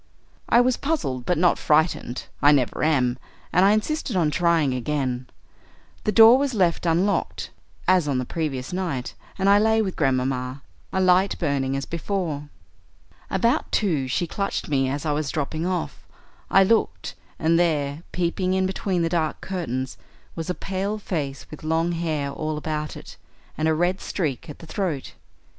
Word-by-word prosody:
"I 240 Hz, -, +6 dB
was 250 Hz, 0 st, +2 dB
puzzled, 135 Hz, -, -2 dB
but 180 Hz, -, +2 dB
not 175 Hz, +1 st, +3 dB
frightened; 150 Hz, -5 st, +1 dB, 0.2 s
I 145 Hz, -, +7 dB
never 135 Hz, -4 st, +1 dB
am, 130 Hz, -5 st, +2 dB, 0.3 s
and 180 Hz, -, +5 dB
I 195 Hz, -, +6 dB
insisted 225 Hz, +3 st, -1 dB
on 165 Hz, -4 st, +2 dB
trying 165 Hz, -4 st, +2 dB
again. 130 Hz, -1 st, -2 dB, 0.8 s
The 215 Hz, -, +2 dB
door 225 Hz, +4 st, +8 dB
was 275 Hz, -3 st, -1 dB
left 175 Hz, -3 st, +1 dB
unlocked, 180 Hz, +5 st, 0 dB, 0.4 s
as 185 Hz, -4 st, +4 dB
on 140 Hz, -3 st, +1 dB
the 125 Hz, -, -1 dB
previous 140 Hz, -2 st, -3 dB
night, 170 Hz, -9 st, -3 dB, 0.2 s
and 195 Hz, -, +1 dB
I 200 Hz, +1 st, +6 dB
lay 220 Hz, +1 st, +3 dB
with 195 Hz, -4 st, -1 dB
Grandmamma, 130 Hz, -1 st, -1 dB, 0.3 s
a 190 Hz, -, 0 dB
light 185 Hz, +1 st, +3 dB
burning 140 Hz, -4 st, 0 dB
as 135 Hz, -, -3 dB
before. 165 Hz, -4 st, -3 dB, 0.8 s
About 230 Hz, -, +1 dB
two 160 Hz, -, +1 dB
she 150 Hz, +7 st, 0 dB
clutched 195 Hz, +1 st, -3 dB
me 135 Hz, -2 st, +1 dB
as 140 Hz, +3 st, -3 dB
I 150 Hz, -, +1 dB
was 150 Hz, 0 st, -1 dB
dropping 155 Hz, +3 st, -2 dB
off. 185 Hz, -1 st, -3 dB, 0.5 s
I 195 Hz, -, +6 dB
looked, 190 Hz, -, +1 dB, 0.2 s
and 165 Hz, +1 st, +2 dB
there, 150 Hz, -3 st, 0 dB
peeping 180 Hz, +1 st, 0 dB
in 190 Hz, 0 st, +2 dB
between 190 Hz, -2 st, -1 dB
the -, -, +2 dB
dark 165 Hz, -2 st, -1 dB
curtains, 130 Hz, -9 st, -4 dB, 0.4 s
was 165 Hz, +1 st, -5 dB
a 180 Hz, -, -1 dB
pale 195 Hz, +2 st, -3 dB
face 145 Hz, -9 st, -4 dB
with 155 Hz, -, -10 dB
long 165 Hz, +2 st, +1 dB
hair 155 Hz, -4 st, -2 dB
all 155 Hz, +2 st, -3 dB
about 150 Hz, 0 st, -3 dB
it, -, -, -11 dB, 0.4 s
and 155 Hz, -, 0 dB
a 160 Hz, -, +3 dB
red 175 Hz, +4 st, 0 dB
streak 150 Hz, -10 st, -3 dB
at 150 Hz, -, -8 dB
the -, -, -12 dB
throat. 165 Hz, -6 st, -3 dB
165 Hz, 170 wpm, -24 LUFS, 140-190 Hz, 0.8 s, door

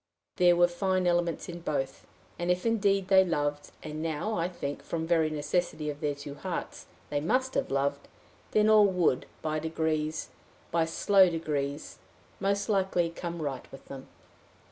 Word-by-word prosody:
There 175 Hz, -1 st, +6 dB
were 175 Hz, 0 st, +5 dB
fine 185 Hz, +1 st, 0 dB
elements 175 Hz, -2 st, +1 dB
in 175 Hz, 0 st, -6 dB
both, 140 Hz, -5 st, -3 dB, 0.3 s
and, 175 Hz, +1 st, -2 dB
if 180 Hz, +3 st, +1 dB
indeed 200 Hz, -4 st, +2 dB
they 190 Hz, -1 st, +7 dB
loved, 145 Hz, -4 st, -1 dB
and 155 Hz, 0 st, -5 dB
now 165 Hz, +7 st, -2 dB
I 170 Hz, -3 st, 0 dB
think, 145 Hz, -5 st, -5 dB
from 160 Hz, -1 st, -3 dB
very 165 Hz, -2 st, +2 dB
necessity 155 Hz, 0 st, -1 dB
of 145 Hz, -, -10 dB
their 150 Hz, -2 st, -1 dB
two 145 Hz, 0 st, -8 dB
hearts, 175 Hz, +4 st, -5 dB, 0.2 s
they 145 Hz, -1 st, 0 dB
must 260 Hz, -, +1 dB
have -, -, 0 dB
loved, 140 Hz, +1 st, -1 dB, 0.4 s
then 215 Hz, 0 st, +3 dB
all 215 Hz, -1 st, +7 dB
would, 180 Hz, -8 st, +1 dB, 0.2 s
by 155 Hz, 0 st, -1 dB
degrees, 160 Hz, -1 st, -1 dB, 0.4 s
by 165 Hz, -1 st, +2 dB
slow 190 Hz, +3 st, +4 dB
degrees, 150 Hz, -3 st, -3 dB, 0.4 s
most 200 Hz, +1 st, 0 dB
likely, 190 Hz, -5 st, +1 dB
come 170 Hz, -1 st, -5 dB
right 135 Hz, -3 st, -5 dB
with 135 Hz, -, -13 dB
them. 135 Hz, -1 st, -8 dB
165 Hz, 165 wpm, -29 LUFS, 150-185 Hz, 0.4 s, they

